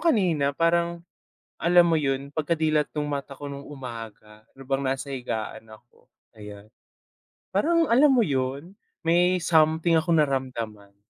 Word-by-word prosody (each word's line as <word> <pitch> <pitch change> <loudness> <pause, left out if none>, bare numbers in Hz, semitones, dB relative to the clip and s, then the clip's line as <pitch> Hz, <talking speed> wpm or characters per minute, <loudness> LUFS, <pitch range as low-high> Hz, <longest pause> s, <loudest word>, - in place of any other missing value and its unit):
kanina 175 - +1
parang, 170 0 +1 0.6
alam 175 +1 +5
mo 165 -2 +2
yun 140 0 -2
pagkadilat 155 -1 0
nung 150 -1 -2
mata 140 -1 -5
ko 145 - -10
nung 140 0 -7
umaga, 115 -6 -9 0.2
habang 135 0 -3
nasa 135 +1 -3
higaan 115 -4 -5
ako, 110 +2 -19 0.2
ayan. 105 0 -12 0.8
Parang, 335 +1 +2
alam 265 +6 +6
mo 255 -4 +4
yun, 135 +3 -2 0.3
may 175 +2 +3
something 160 +1 +3
akong 165 +1 +1
naramdaman. 115 -8 -2
145 Hz, 130 wpm, -25 LUFS, 130-170 Hz, 0.8 s, alam